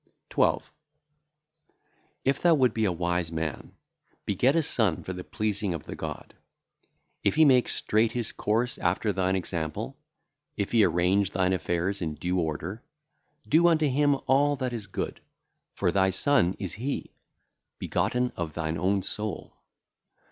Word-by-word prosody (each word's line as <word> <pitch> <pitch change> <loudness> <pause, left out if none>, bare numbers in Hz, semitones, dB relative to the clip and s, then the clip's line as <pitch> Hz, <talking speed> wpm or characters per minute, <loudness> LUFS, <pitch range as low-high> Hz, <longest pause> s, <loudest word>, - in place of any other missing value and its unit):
12. - - +1 1.5
If 135 0 +1
thou 170 -2 +5
wouldest 130 -4 +3
be 110 -1 +1
a 95 - +2
wise 85 -1 -1
man, 80 -3 -4 0.5
beget 125 - +2
a 165 - +3
son 110 - 0
for 95 - -5
the 90 0 -6
pleasing 105 -3 -1
of 80 - -7
the - - -7
God. - - -7 0.9
If - - +2
he 160 0 +6
make 130 -4 +4
straight 110 +2 +1
his 120 -3 -3
course 115 +3 -1
after 95 +4 0
thine 95 0 +1
example, 85 -4 -3 0.6
if 100 - -2
he 115 -3 +5
arrange 90 +3 +2
thine 95 0 +1
affairs 90 +2 -1
in 80 -3 -2
due 90 +3 -1
order, 85 +6 -3 0.7
do 165 +3 +5
unto 155 -3 +3
him 145 +1 +3
all 145 +2 +3
that 130 -2 -3
is 110 -4 -5
good, 100 - -4 0.5
for - - +1
thy 95 -1 +3
son 95 -2 +3
is 95 -5 -5
he, 135 +6 -4 0.7
begotten 125 0 0
of 80 -3 -4
thine 80 0 -2
own 95 +2 +1
soul. 105 +2 -5
100 Hz, 150 wpm, -27 LUFS, 90-125 Hz, 1.5 s, he